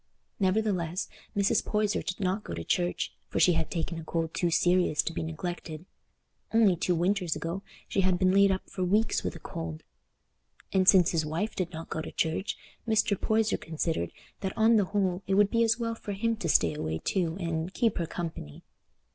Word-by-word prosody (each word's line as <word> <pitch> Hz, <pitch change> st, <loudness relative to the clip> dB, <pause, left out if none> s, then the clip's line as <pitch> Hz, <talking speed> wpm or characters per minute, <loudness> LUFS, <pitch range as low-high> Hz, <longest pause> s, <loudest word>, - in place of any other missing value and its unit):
Nevertheless, 190 Hz, -3 st, 0 dB, 0.3 s
Mrs. 200 Hz, 0 st, +3 dB
Poyser 210 Hz, -1 st, 0 dB
did 185 Hz, -1 st, -4 dB
not 195 Hz, +2 st, 0 dB
go -, -, -5 dB
to -, -, -5 dB
church, 180 Hz, -5 st, -1 dB, 0.2 s
for -, -, -1 dB
she 180 Hz, -, +6 dB
had 165 Hz, -1 st, -1 dB
taken 165 Hz, 0 st, -3 dB
a -, -, -7 dB
cold 165 Hz, 0 st, -2 dB
too 175 Hz, -, +1 dB
serious 175 Hz, -2 st, +3 dB
to 170 Hz, -, -3 dB
be -, -, -3 dB
neglected; 160 Hz, 0 st, -5 dB, 0.7 s
only 215 Hz, -5 st, +5 dB
two 175 Hz, +1 st, 0 dB
winters 180 Hz, -1 st, +1 dB
ago 165 Hz, +5 st, -4 dB, 0.3 s
she 195 Hz, -, +1 dB
had 185 Hz, -1 st, +2 dB
been 185 Hz, 0 st, +3 dB
laid 200 Hz, 0 st, +5 dB
up 190 Hz, -, -2 dB
for 185 Hz, -, -3 dB
weeks 210 Hz, +5 st, +2 dB
with -, -, -3 dB
a -, -, -8 dB
cold; 80 Hz, -1 st, -6 dB, 0.9 s
and 190 Hz, -1 st, +5 dB
since 180 Hz, -4 st, +6 dB
his 165 Hz, -2 st, +1 dB
wife 165 Hz, +8 st, -2 dB
did 185 Hz, -2 st, -2 dB
not 165 Hz, -1 st, -8 dB
go 160 Hz, -, -2 dB
to -, -, -7 dB
church, 165 Hz, +5 st, -1 dB, 0.3 s
Mr. 215 Hz, -2 st, +3 dB
Poyser 220 Hz, +2 st, +1 dB
considered 160 Hz, -, -2 dB, 0.3 s
that 190 Hz, -1 st, -4 dB
on 225 Hz, +1 st, +5 dB
the 205 Hz, -3 st, +4 dB
whole 190 Hz, -2 st, 0 dB
it 190 Hz, -, +2 dB
would 205 Hz, 0 st, +4 dB
be 230 Hz, -1 st, +3 dB
as 225 Hz, 0 st, +3 dB
well 230 Hz, -1 st, -2 dB
for 210 Hz, -2 st, -6 dB
him 230 Hz, +3 st, 0 dB
to 175 Hz, -7 st, -3 dB
stay -, -, +4 dB
away 80 Hz, -, -3 dB
too 170 Hz, -, -1 dB
and 165 Hz, 0 st, -3 dB
"keep 230 Hz, -6 st, +1 dB
her 170 Hz, -, -1 dB
company." 160 Hz, -, -6 dB
185 Hz, 200 wpm, -29 LUFS, 165-205 Hz, 0.9 s, she